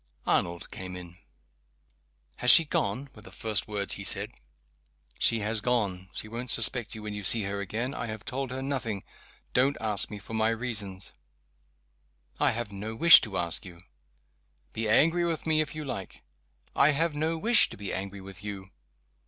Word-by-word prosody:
Arnold 85 0 -1
came 90 -1 -8
in. 90 -1 -11 1.2
"Has 125 - 0
she 165 +6 +9
gone?" 130 +1 -2
were 105 - -14
the 95 - -13
first 105 +1 +1
words 100 -2 -3
he 100 - -6
said. 95 - -2 0.9
"She 115 -1 +1
has 110 +1 -1
gone. 100 -7 -2
She - - -7
won't 120 +3 -7
suspect 120 -2 +5
you 110 - -9
when 105 -1 -6
you 105 0 -6
see 110 +3 +6
her 100 0 -4
again. 115 +7 -4
I 120 - -5
have 110 -1 -8
told 135 0 -4
her 130 +1 -5
nothing. 130 -8 -3 0.5
Don't 135 +3 +2
ask 105 -3 +2
me 105 - -7
for 100 +2 -11
my 110 0 +1
reasons!" 110 -5 -3 1.3
"I - - +4
have 115 -2 -3
no 105 +3 -7
wish 170 +7 +8
to 100 -4 -5
ask 85 -2 -1
you." 90 -2 -12 0.9
"Be 110 -1 -2
angry 165 +10 +3
with 165 -2 -2
me, 155 -1 +2
if 155 - -5
you 155 -1 -6
like!" 100 -8 -7 0.5
"I 145 +1 +5
have 165 +2 +1
no 160 +2 -2
wish 230 +8 +5
to - - -10
be 100 -1 -5
angry 100 +1 -6
with 95 0 -11
you." 95 -2 -8
110 Hz, 180 wpm, -27 LUFS, 100-130 Hz, 1.3 s, she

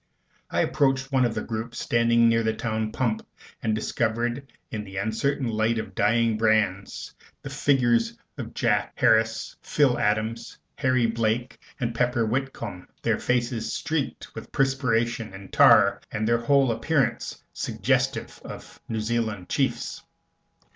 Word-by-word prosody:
I - - +1
approached 135 -2 +1
one 130 -2 +3
of 115 -2 -1
the 110 - -2
groups 115 +1 -5
standing 115 0 +3
near 115 0 +3
the 110 -1 0
town 110 -1 -2
pump, 115 -3 -1 0.4
and 110 -2 0
discovered 120 +4 -1 0.2
in 105 -2 -3
the 95 -1 -9
uncertain 120 +7 0
light 110 +1 +1
of 110 - -3
the - - -19
dying 110 +3 +2
brands 110 -3 0 0.3
the - - -6
figures 120 -5 +2 0.2
of - - -7
Jack - - +1
Harris, 110 0 +2
Phil 140 -5 +2
Adams, 110 +2 -1 0.2
Harry 130 -3 +2
Blake, 115 +2 -1 0.2
and 120 -3 -1
Pepper 120 -1 +1
Whitcomb, 115 -6 -3 0.2
their - - +1
faces 120 -2 -1
streaked - - -3
with - - -9
perspiration 120 -5 0
and 95 0 -12
tar, - - +6
and, 110 +1 -1
their 120 0 +3
whole 135 +1 +3
appearance 135 +4 -1
suggestive - - -1
of - - -10
New 110 -1 -1
Zealand 110 -4 -2
chiefs. - - -1
115 Hz, 140 wpm, -25 LUFS, 110-125 Hz, 0.4 s, tar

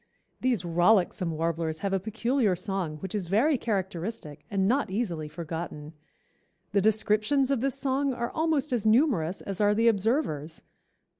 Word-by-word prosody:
These 245 -7 0
rollicksome 175 +1 +2
Warblers 160 0 -2
have 195 - 0
a 195 - +2
peculiar 225 +1 0
song 185 -4 -3
which 190 - -5
is 200 -5 -2
very 235 - +3
characteristic 190 - -3
and 195 -1 +1
not 265 +2 +1
easily 185 -7 -2
forgotten. 160 -1 -6 0.8
The 200 0 +2
descriptions 220 +6 +2
of 265 -4 +1
this 275 0 0
song 275 0 0
are 240 -2 -3
almost 310 -3 0
as 235 -4 0
numerous 215 - +2
as 195 0 -4
are 205 0 +4
the 230 +2 +3
observers. 200 - 0
205 Hz, 150 wpm, -27 LUFS, 170-240 Hz, 0.8 s, are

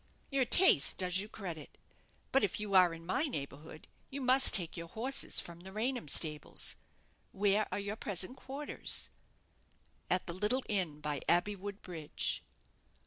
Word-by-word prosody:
"Your 270 -2 +1
taste 245 - +6
does 180 0 +2
you 205 +2 -5
credit. 175 -9 -9 0.5
But 270 - +2
if 205 - -1
you 210 -1 -5
are 185 -2 +5
in 165 0 -10
my 220 - 0
neighbourhood, 150 - -8 0.2
you 275 - -6
must 260 +1 +6
take 170 -5 +3
your 170 -1 -7
horses 260 +9 0
from 170 0 -8
the 190 +2 -12
Raynham 235 - -3
stables. 150 +1 0 0.6
Where 205 +1 +1
are - - -2
your 205 +1 -5
present 195 +3 0
quarters?" 275 +3 0 1.0
"At 185 - +1
the 170 - -5
little 210 +8 -1
inn 175 -8 -2
by 150 -1 -3
Abbeywood 200 +3 -1
Bridge." 160 -5 -4
195 Hz, 150 wpm, -32 LUFS, 170-230 Hz, 1.0 s, taste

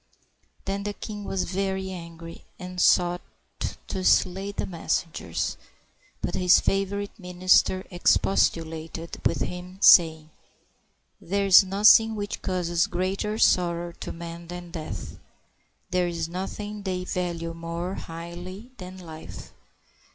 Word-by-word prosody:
Then 195 +1 -2
the 205 0 -3
king 205 -1 -7
was 195 -1 -1
very 190 0 -2
angry, 170 -2 -9
and 180 -1 -5
sought 175 0 +4 0.7
to 190 - -3
slay 190 +2 +2
the - - -3
messengers; 165 - -2 0.7
but 175 - -2
his 180 -1 +5
favorite 200 +2 -1
minister 185 +1 +2
expostulated 165 -2 0
with - - -3
him, 180 +1 -5
saying, 160 -4 +6 0.9
"There 200 +3 0
is 195 0 +9
nothing 210 +3 +6
which 205 -1 -4
causes 175 -2 0
greater 190 +4 -2
sorrow 175 -4 +2
to - - -5
men 170 0 -8
than 175 0 -8
death; 155 - -7 0.7
there 180 -1 +2
is 165 -2 -3
nothing 205 +4 -5
they 185 -2 -3
value 170 -2 -3
more 170 +2 -4
highly 175 +7 -8
than 185 0 -9
life. 160 -3 -10
180 Hz, 120 wpm, -26 LUFS, 170-195 Hz, 0.9 s, is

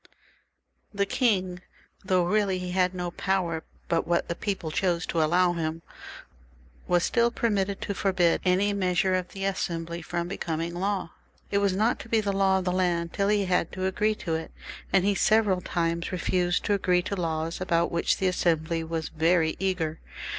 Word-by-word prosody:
The 200 0 +2
king, 190 -6 0 0.4
though 185 -2 +2
really 195 0 +1
he 180 0 -4
had 185 0 +1
no 175 -1 -3
power 175 -4 -1 0.2
but 165 -1 0
what 170 0 +1
the - - 0
people 190 -3 -3
chose 175 +1 0
to 165 - 0
allow 175 +3 +3
him, 165 -1 -3 1.0
was 175 -1 +3
still 235 0 +2
allowed 200 -3 0
to 200 - -2
forbid 185 -3 +2
any 190 +3 +2
measure 185 -1 +1
of 185 -1 0
the 195 +1 -5
Assembly 170 -3 -2
from 170 +1 -3
becoming 170 -3 -3
law; 190 0 -2 0.4
it 200 - +2
was 200 -2 +1
not 220 +5 +1
to - - -10
be 225 - +3
the 205 -2 -1
law 195 -1 +3
of 185 - -3
the 180 - +1
land 175 -2 0
till 200 - 0
he 205 -1 +2
had 180 -3 +1
agreed 200 +3 0
to 165 - -2
it, 160 0 -3 0.4
and 190 -1 +3
he 205 - +3
several 205 -2 +3
times 170 -1 -1
refused 180 0 0
to 205 - +2
agree 180 -2 +2
to 200 - -3
laws 165 -1 -2
about 170 -2 +1
which 170 - +1
tha 190 - -1
Assembly 165 -2 0
was 160 0 -3
very 160 0 +2
eager. 180 -5 -1
180 Hz, 180 wpm, -27 LUFS, 170-195 Hz, 1.0 s, allow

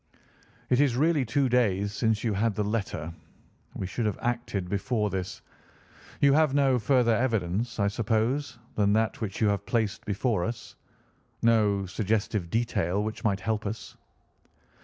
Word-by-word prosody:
"It 125 +2 +5
is 135 -5 +2
really 155 0 +3
two 135 +4 +1
days 105 -5 +1
since 110 -1 0
you 115 -3 0
had 105 +1 0
the 105 - 0
letter. 100 -7 -3 0.6
We - - -3
should 110 +4 -2
have 105 - -2
acted 120 -6 -2
before 105 +2 -1
this. 95 -1 -4 0.8
You 140 -1 +6
have 150 -2 +3
no 135 -3 +3
further 120 +1 +3
evidence, 115 -1 -1
I 100 - +3
suppose, 115 +6 0 0.2
than 100 -1 +2
that 110 +2 0
which 100 -3 -4
you 110 - +4
have 100 0 -1
placed 110 -4 -1
before 105 -1 0
us—no 110 -2 -2
suggestive 105 -1 -1
detail 105 -3 0
which 110 0 -5
might 100 -3 +1
help 110 +2 -1
us?" 110 +3 -6
110 Hz, 150 wpm, -27 LUFS, 100-120 Hz, 0.8 s, You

